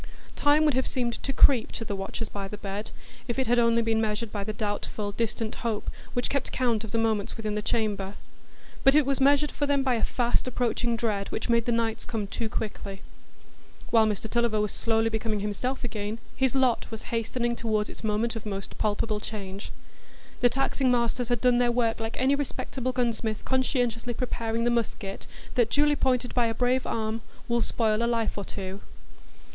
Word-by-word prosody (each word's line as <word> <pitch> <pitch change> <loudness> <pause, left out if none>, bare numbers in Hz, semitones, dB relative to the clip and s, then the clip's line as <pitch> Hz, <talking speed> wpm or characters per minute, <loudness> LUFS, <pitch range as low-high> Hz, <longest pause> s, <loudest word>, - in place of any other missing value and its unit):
Time 295 +1 +4
would 300 - +4
have 260 +1 +1
seemed 240 -2 -1
to 275 - -2
creep 265 -3 +5
to 225 - -5
the 205 - -3
watchers 195 +3 -4
by 200 -2 -5
the 210 - -7
bed, 205 +1 -5 0.4
if 240 - -2
it 265 - +2
had 245 0 +3
only 230 0 +4
been 225 -1 +2
measured 215 0 -1
by 205 -2 -3
the 215 - -3
doubtful, 205 0 -3
distant 225 +1 -2
hope 225 -3 -2 0.2
which 245 - 0
kept 280 - -1
count 235 -4 +1
of 220 - -6
the 230 - -1
moments 220 -2 0
within 215 -2 -2
the 210 - -1
chamber; 205 -3 -1 0.7
but 270 0 +6
it 300 -2 +6
was 275 0 0
measured 285 +2 +4
for 290 - -1
them 280 -1 +2
by 260 -2 +2
a 225 -2 0
fast 240 0 +1
approaching 240 -1 0
dread 210 -4 -1
which - - -3
made 235 -1 +3
the 240 - +1
nights 230 -1 0
come 225 -4 -3
too 220 +3 -3
quickly. 200 -3 -5 0.9
While 225 -2 +6
Mr 210 +1 -2
Tulliver 235 -1 +1
was 210 -1 0
slowly 225 0 +1
becoming 220 -1 -1
himself 230 +7 -2
again, 215 -2 -3 0.2
his 265 -1 +1
lot 260 -3 +2
was 225 +1 -7
hastening 235 +1 0
toward 215 -3 0
its - - -10
moment 220 +2 0
of 225 - -5
most 195 -2 -5
palpable 210 0 0
change. 200 -2 -6 0.7
The 245 - +5
taxing 270 +1 +1
masters 240 0 +1
had 240 -2 +1
done 250 -1 +4
their 245 -1 +3
work 230 -2 +1
like 225 0 -4
any 260 +2 +4
respectable 265 -2 -2
gunsmith 230 -3 -1
conscientiously 245 -3 0
preparing 230 -2 -1
the 240 - +3
musket, 215 -4 -2 0.3
that, 240 -3 +3
duly 295 +2 +3
pointed 255 -3 +1
by 240 -2 +3
a 225 - -2
brave 250 +2 +1
arm, 220 0 -1 0.3
will 235 -1 +2
spoil 220 -2 +1
a - - +2
life 230 -2 0
or 200 - -3
two. 195 0 -6
230 Hz, 195 wpm, -27 LUFS, 215-245 Hz, 0.9 s, but